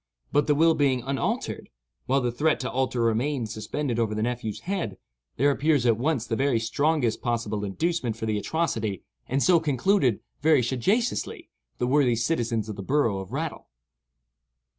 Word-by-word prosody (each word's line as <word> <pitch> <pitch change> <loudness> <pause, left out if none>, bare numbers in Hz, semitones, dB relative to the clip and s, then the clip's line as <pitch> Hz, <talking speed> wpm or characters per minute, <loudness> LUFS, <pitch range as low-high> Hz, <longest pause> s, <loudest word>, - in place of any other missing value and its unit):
But 145 0 +2
the 150 - +3
will 165 +2 +5
being 135 -5 +1
unaltered, 135 -1 -2 0.4
while 135 +1 +2
the 120 -1 0
threat 150 +6 +1
to 130 - -3
alter 130 -1 -1
remained 115 +1 0
suspended 120 +3 -3
over 110 -2 0
the 110 - -1
nephew's 120 -3 -3
head, 175 - -3 0.4
there 145 +3 +4
appears 145 -2 +2
at 115 -2 +4
once 135 -3 0
the 115 - -2
very 135 -2 +2
strongest 130 +1 0
possible 115 -4 -2
inducement 125 - -1
for 110 - -5
the 105 -1 0
atrocity, 110 - -2 0.2
and 135 +2 +1
so 175 -2 +5
concluded, 145 - +2 0.2
very 150 -3 +4
sagaciously, 195 - -1 0.3
the 125 - 0
worthy 130 -2 +3
citizens 115 -3 0
of 105 -2 -6
the - - -4
borough 115 -3 +1
of 95 +1 -8
Rattle. 155 +3 -4
125 Hz, 165 wpm, -26 LUFS, 115-150 Hz, 0.4 s, will